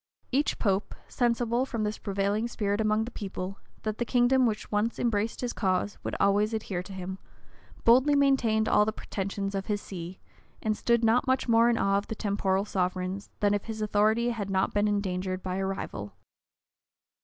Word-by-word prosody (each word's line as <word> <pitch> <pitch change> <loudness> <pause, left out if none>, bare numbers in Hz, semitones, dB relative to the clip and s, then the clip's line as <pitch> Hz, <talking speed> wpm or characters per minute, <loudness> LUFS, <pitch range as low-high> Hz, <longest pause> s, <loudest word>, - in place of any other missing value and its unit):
[*] - - -41
Each 280 +3 +1
pope, 195 -1 0
sensible, 240 0 +1
from 230 -5 -3
this 210 0 -2
prevailing 200 +2 0
spirit 205 -2 -1
among 215 0 +2
the 240 - -7
people, 195 -2 -5 0.2
that 215 -1 -3
the - - +2
kingdom 245 +1 +3
which 215 -1 -3
once 210 +2 0
embraced 225 -1 0
his 245 -1 -2
cause 190 +1 -1
would - - -3
always 205 +3 +3
adhere 195 -5 -3
to 185 - -11
him, 190 0 -6 0.6
boldly 260 +5 +5
maintained 250 -6 +3
all - - +5
the 215 - 0
pretensions 195 -1 -4
of 195 -1 -3
his 210 -1 0
see, 180 -2 -8 0.4
and 215 -1 0
stood 235 +1 +1
not 235 +4 +3
much 260 0 +1
more 230 0 +5
in 235 - +2
awe 195 -1 +2
of 200 - -9
the 220 - -4
temporal 200 -2 0
sovereigns, 185 0 -2
than 205 -1 +3
if 205 - -1
his 220 -1 -5
authority 215 +3 +2
had 210 -4 -4
not 190 -1 +1
been 205 0 +2
endangered 185 -2 -1
by 185 0 -2
a 195 - -1
rival. 105 - -5
210 Hz, 190 wpm, -28 LUFS, 195-230 Hz, 0.6 s, boldly